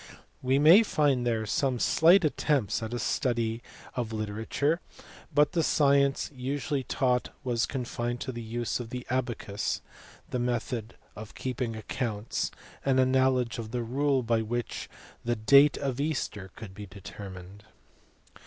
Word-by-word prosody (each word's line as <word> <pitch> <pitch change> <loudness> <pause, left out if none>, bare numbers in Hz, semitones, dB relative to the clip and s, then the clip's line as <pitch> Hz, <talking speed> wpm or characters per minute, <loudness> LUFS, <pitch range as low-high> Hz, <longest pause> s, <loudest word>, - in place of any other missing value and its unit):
We 130 +1 +2
may 160 +9 +8
find 145 - +1
there 110 -2 0
some 130 +3 0
slight 170 +8 +5
attempts 140 -8 +1
at 110 0 -4
a 120 - -2
study 115 -2 0 0.3
of 120 -3 -3
literature; 110 +9 -1 0.5
but 150 0 +4
the 170 - +1
science 140 -3 +3
usually 135 +2 -2
taught 125 -2 0
was 120 -2 0
con 130 -3 -3
fined 120 +1 -3
to 130 - -3
the 120 -1 -6
use 115 +2 -2
of 120 -2 -6
the 125 +1 -6
abacus, 120 -5 -2 0.5
the 125 - -2
method 120 -2 -2 0.2
of 110 0 -9
keeping 125 -3 -3
accounts, 110 -1 -3 0.3
and 135 -1 +3
a 130 - +5
knowledge 130 -2 +2
of 110 -2 -5
the 120 +1 -2
rule 135 +2 +1
by 115 -1 +1
which 120 +2 -3 0.3
the 120 0 0
date 140 +6 +6
of 135 -1 -2
Easter 135 -10 -2
could 110 -4 -9
be 105 +1 -8
determined. 95 0 -10
125 Hz, 150 wpm, -28 LUFS, 115-140 Hz, 0.5 s, may